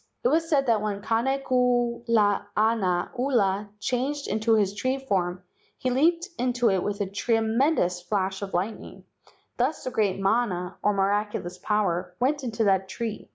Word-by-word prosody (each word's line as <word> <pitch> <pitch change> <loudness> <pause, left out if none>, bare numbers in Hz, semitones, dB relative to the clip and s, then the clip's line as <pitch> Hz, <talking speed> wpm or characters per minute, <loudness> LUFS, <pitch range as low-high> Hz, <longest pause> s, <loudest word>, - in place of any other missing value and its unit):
It 245 - +3
was 325 +3 +1
said 280 -3 +3
that 230 -4 +2
when 205 -2 -3
Kane 265 +5 0
kulana 230 -6 +1
ula 210 -6 +1
changed 270 +6 -2
into 220 +1 +2
his 200 -2 +2
tree 255 +6 -1
form 185 -8 -2 0.3
he 255 - -1
leaped 335 +7 +2
into 245 -2 +2
it 190 -1 +1
with 205 +1 -3
a - - +1
tre¬ 205 +4 0
mendous 220 - +1
flash 195 -1 -1
of 195 -2 -4
lightning, 200 +5 -4 0.5
thus 255 +6 0
the 255 - -3
great 205 -5 0
mana, 195 -4 0
or 210 - +2
miraculous 195 -2 -1
power, 180 -4 -1
went 280 +3 +1
into 230 -2 -1
that 190 -2 +2
tree. 225 -2 -5
220 Hz, 155 wpm, -26 LUFS, 195-250 Hz, 0.5 s, It